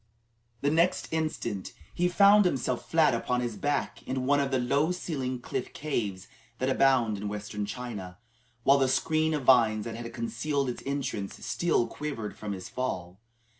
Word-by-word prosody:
The 140 - +2
next 170 +3 +2
instant, 155 -11 -2 0.2
he 175 - +1
found 200 +3 +6
himself 130 -7 -1
flat 160 -5 +4
upon 125 +1 0
his 120 -3 -3
back 145 +2 -1
in 130 0 -2
one 145 +2 +3
of 140 -1 +1
the 135 - +1
low 140 +6 +2
ceiled 130 -8 -3
cliff 125 - -4
caves 105 -10 -3 0.3
that 130 +2 0
abound 130 -6 +3
in 105 - -4
Western 105 0 -4
China, 105 -6 -6 0.5
while 140 +2 +5
the 135 - +3
screen 155 +4 +1
of 145 - -3
vines 115 -5 +4
that 115 - -4
had 115 +1 -6
concealed 120 +5 -1
its 120 - -5
entrance 135 -8 -3
still 170 -8 +1
quivered 115 -4 -5
from 105 -1 -5
his 95 -2 -7
fall. 95 -8 -4
130 Hz, 170 wpm, -28 LUFS, 110-145 Hz, 0.5 s, found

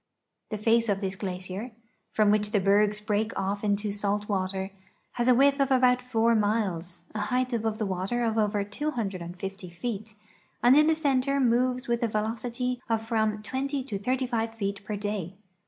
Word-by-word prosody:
The 215 - -3
face 230 +2 +2
of 200 -1 +1
this 195 -1 -3
glacier, 190 +4 -5 0.4
from 210 -1 +3
which 210 0 +2
the 210 -1 +2
bergs 205 +2 +3
break 210 +1 -1
off 200 +2 -2
into 205 0 0
salt 205 0 -1
water, 190 -1 -1 0.4
has 240 0 -1
a 250 - +6
width 275 +2 +4
of 275 -1 +3
about 250 -1 +4
four 235 -2 +2
miles, 205 -6 0
a 215 - -3
height 250 +4 0
above 220 -2 -1
the 215 - -1
water 195 +6 -1
of 225 -1 +1
over 210 -2 +1
250 195 - -4
feet, 215 +4 -5 0.5
and 245 +2 +7
in 305 +1 +6
the 320 - +4
center 275 -2 +1
moves 250 +1 +2
with 235 -1 0
a 235 - +2
velocity 235 +3 -2
of 225 -1 +1
from 220 -2 0
20 270 +3 -2
to 215 -7 -4
35 235 -1 -1
feet 200 -2 -3
per 210 - -4
day. 200 -3 -3
215 Hz, 175 wpm, -27 LUFS, 200-245 Hz, 0.5 s, and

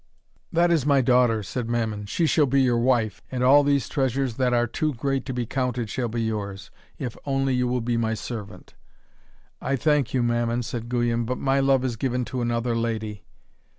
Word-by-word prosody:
'That 170 +1 +3
is 165 -5 +3
my 140 -1 +4
daughter,' 125 -3 +3
said 115 +4 -4
Mammon. 110 -3 -2
'She 165 - 0
shall 150 -2 +3
be 135 +2 +2
your 120 -2 +2
wife, 120 -3 +1
and 125 -1 -1
all 140 +3 +6
these 140 -1 +1
treasures 130 -3 -1
that 130 -2 +2
are 120 -1 +3
too 150 +4 -2
great 135 +2 -2
to - - -2
be 125 -1 -2
counted 125 -3 -2
shall 125 -2 -1
be 115 0 -2
yours, 100 -3 -4 0.3
if 125 -3 -5
only 135 -1 0
you 125 0 +1
will 125 0 0
be 120 0 -1
my 115 -1 0
servant.' 110 -3 -8 0.9
'I 135 - 0
thank 145 -1 +1
you, 125 -2 +1
Mammon,' 120 0 0
said 120 0 -5
Guyon, 120 -1 0
'but 125 +2 -2
my 135 0 +1
love 135 -1 +3
is 120 -3 -2
given 125 0 -1
to 125 +1 -4
another 120 0 0
lady.' 110 -3 -3
125 Hz, 200 wpm, -24 LUFS, 115-135 Hz, 0.9 s, all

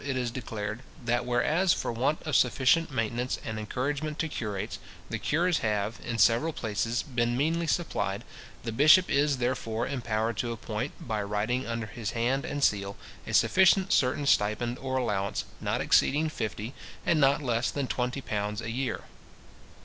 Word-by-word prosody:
it 135 -2 -2
is 125 -2 -1
declared, 110 -3 -4 0.3
"That 120 +1 0
whereas, 155 +9 +3
for - - -2
want 130 +6 0
of 155 - -1
sufficient 130 +6 +3
maintenance 120 0 -1
and 110 -1 -3
encouragement 145 +7 -2
to 165 - -1
curates, 105 -9 -4 0.3
the - - -2
cures 170 0 +1
have, 105 0 -1
in 115 - -3
several 120 +8 +4
places, 115 0 -1
been 120 -3 0
meanly 165 +4 +1
supplied, 170 0 -1 0.4
the 115 - -3
bishop 150 +10 +6
is, 145 0 +3
therefore, 120 -2 -1
empowered 115 -4 -1
to 120 +5 -1
appoint, 115 +3 -5
by 110 -2 -1
writing 105 +5 -1
under 115 -1 -2
his 105 +1 -5
hand 130 +4 +1
and 145 -1 -3
seal, 100 -3 +1 0.3
a - - -4
sufficient 190 +2 +4
certain 140 +3 +2
stipend 120 0 +1
or 130 0 -2
allowance, 100 -6 -1
not - - -1
exceeding 155 +3 +3
fifty, 110 -3 -4 0.3
and 160 -3 +3
not 140 +2 +4
less 120 -2 +1
than 140 -2 -2
twenty 125 +2 -2
pounds 105 -2 -2
a 115 0 -4
year". 130 +2 -2
120 Hz, 165 wpm, -28 LUFS, 110-140 Hz, 0.4 s, bishop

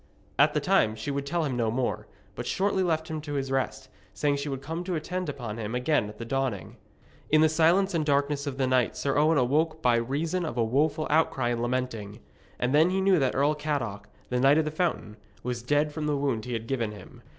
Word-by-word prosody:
At - - +5
that - - 0
time 110 0 +3
she 110 +6 -4
would 140 0 -3
tell 165 +2 0
him 135 -4 -2
no 115 -2 +1
more, 125 +2 -2 0.3
but - - -6
shortly 195 0 +1
left 160 -3 0
him 155 -1 -4
to 145 -1 -6
his 135 -1 -2
rest, 135 -1 -2 0.3
saying 145 -1 +1
she 140 +1 -4
would 135 -1 -5
come 165 +3 -4
to 180 -1 -2
attend 180 +2 -3
upon 120 -6 -5
him 110 +2 -4
again 125 -3 +1
at 105 - -11
the 115 - -6
dawning. 130 -5 -2 0.5
In 155 0 +5
the 160 - +6
silence 170 +5 +3
and 165 -2 +1
darkness 140 0 0
of 135 -2 -4
the 135 - +1
night 130 -3 +1
Sir 140 - -1
Owen 155 +2 +4
awoke 155 +5 +1
by 120 -1 +4
reason 155 +9 -1
of 155 -7 -4
a 115 - +3
woful 145 +6 +1
outcry 140 -5 +2
and 120 -1 -1
lamenting; 120 -4 -3 0.4
and 125 +2 0
then 155 +4 +5
he 190 +1 0
knew 190 -2 +4
that 135 -2 +1
Earl 145 +3 +3
Cadoc, 125 -10 -3 0.2
the 125 - 0
Knight 135 +3 +5
of 160 - +2
the 155 - -2
Fountain, 155 - -2 0.3
was 125 -1 -3
dead 145 +5 +1
from 155 -1 -3
the 145 -1 +1
wound 135 -6 -1
he 125 - -4
had 115 -1 -3
given 115 -4 -1
him. 100 -3 -13
140 Hz, 235 wpm, -27 LUFS, 125-155 Hz, 0.5 s, the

